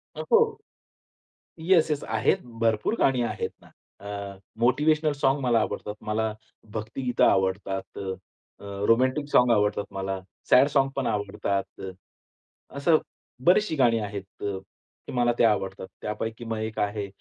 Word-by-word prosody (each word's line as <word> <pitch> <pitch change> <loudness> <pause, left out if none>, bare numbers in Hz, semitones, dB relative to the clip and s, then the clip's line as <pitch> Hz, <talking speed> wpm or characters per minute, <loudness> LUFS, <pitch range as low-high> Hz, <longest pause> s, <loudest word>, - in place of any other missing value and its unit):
अ, - - -4
हो. 455 -1 +4 1.0
Yes, 165 -1 +4
yes. 145 - -1
आहेत 110 -1 +1 0.2
भरपूर 115 - +1
गाणी 130 -2 +3
आहेत 120 - -2
ना. - - -18 0.3
अ, 100 -1 -6 0.2
मोटिव्हेशनल 150 +6 +3
सॉंग 135 +2 +3
मला 120 -3 +3
आवडतात. 105 - -4
मला 110 0 -1 0.4
भक्तिगीतं 115 +4 -1
आवडतात, 95 0 0
अ, 95 -1 -3 0.5
अ, 100 0 -4
रोमॅन्टिक 130 +5 +3
सॉंग 125 -1 +5
आवडतात 105 -1 +2
मला. 95 0 -3 0.3
सॅड 135 +3 +7
सॉंगपण 135 -1 +2
आवडतात. 100 -2 -1 0.2
अ, 95 - -5 0.9
असं 155 +3 +4 0.5
बरीचशी 185 -1 +4
गाणी 120 -5 +3
आहेत 100 -2 -7
अ, 100 -1 -2 0.5
की - - -6
मला 120 -1 +3
ते - - +5
आवडतात. 95 -4 +1
त्यापैकी 110 +2 -4
मग 115 -1 -3
एक 110 0 -4
आहे 105 0 -1
110 Hz, 140 wpm, -26 LUFS, 100-135 Hz, 1.0 s, सॅड